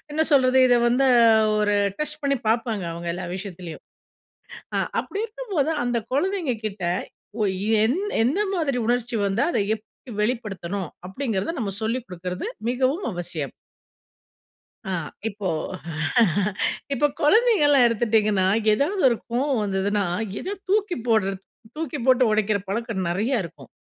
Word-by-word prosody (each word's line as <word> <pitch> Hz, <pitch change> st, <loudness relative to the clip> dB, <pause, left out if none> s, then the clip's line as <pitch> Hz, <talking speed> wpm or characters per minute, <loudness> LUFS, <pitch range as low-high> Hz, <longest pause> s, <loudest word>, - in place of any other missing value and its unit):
என்ன 315 Hz, -, +2 dB
சொல்றது 260 Hz, -1 st, +5 dB
இத 245 Hz, -, +5 dB
வந்து 265 Hz, +3 st, +3 dB, 0.5 s
ஒரு 205 Hz, -1 st, +2 dB, 0.2 s
டெஸ்ட் 300 Hz, 0 st, -2 dB
பண்ணி 280 Hz, -1 st, +1 dB
பாப்பாங்க 225 Hz, -3 st, 0 dB
அவங்க 170 Hz, +1 st, -7 dB
எல்லா 180 Hz, 0 st, -5 dB
விஷயத்துலயும். 180 Hz, -4 st, -8 dB, 0.9 s
ஆ -, -, +2 dB, 0.2 s
அப்படி 400 Hz, -, -5 dB
இருக்கும்போது 430 Hz, -, -2 dB, 0.2 s
அந்த 245 Hz, -1 st, 0 dB, 0.2 s
குழந்தைங்ககிட்ட 255 Hz, -, -1 dB, 0.6 s
ஒ -, -, +3 dB, 0.4 s
எந் 290 Hz, -, +1 dB, 0.2 s
எந்த 275 Hz, -, +1 dB, 0.2 s
மாதிரி 285 Hz, -7 st, 0 dB
உணர்ச்சி 240 Hz, -1 st, 0 dB
வந்தா 200 Hz, +4 st, +1 dB
அத -, -, +1 dB, 0.2 s
எப்படி 225 Hz, +3 st, -15 dB
வெளிப்படுத்தனும். 200 Hz, -6 st, -2 dB, 0.2 s
அப்படின்கிறத 225 Hz, -, -2 dB
நம்ம 200 Hz, -4 st, -2 dB
சொல்லிக் 230 Hz, +3 st, -1 dB
கொடுக்குறது 180 Hz, 0 st, -5 dB, 0.2 s
மிகவும் 260 Hz, +8 st, 0 dB
அவசியம். 170 Hz, -6 st, -4 dB, 1.4 s
ஆ -, -, -1 dB, 0.4 s
இப்போ 200 Hz, -3 st, -4 dB, 1.5 s
இப்போ 295 Hz, +3 st, +3 dB
குழந்தைகள்லாம் 300 Hz, -, +5 dB
எடுத்துட்டீங்கன்னா, 215 Hz, -4 st, +2 dB, 0.3 s
ஏதாவது 345 Hz, -, 0 dB
ஒரு 235 Hz, -, +1 dB
கோவம் 255 Hz, 0 st, +1 dB
வந்ததுன்னா, 200 Hz, +1 st, 0 dB, 0.4 s
எத 400 Hz, +2 st, -4 dB
தூக்கி 410 Hz, -3 st, +1 dB
போடுறது, 195 Hz, -4 st, +2 dB, 0.4 s
தூக்கி 305 Hz, -2 st, -3 dB
போட்டு 255 Hz, -1 st, +5 dB
உடைக்கிற 215 Hz, -1 st, +2 dB
பழக்கம் 205 Hz, -3 st, -2 dB
நெறைய 215 Hz, +7 st, 0 dB
இருக்கும். 170 Hz, -, -11 dB
235 Hz, 125 wpm, -24 LUFS, 200-280 Hz, 1.5 s, சொல்றது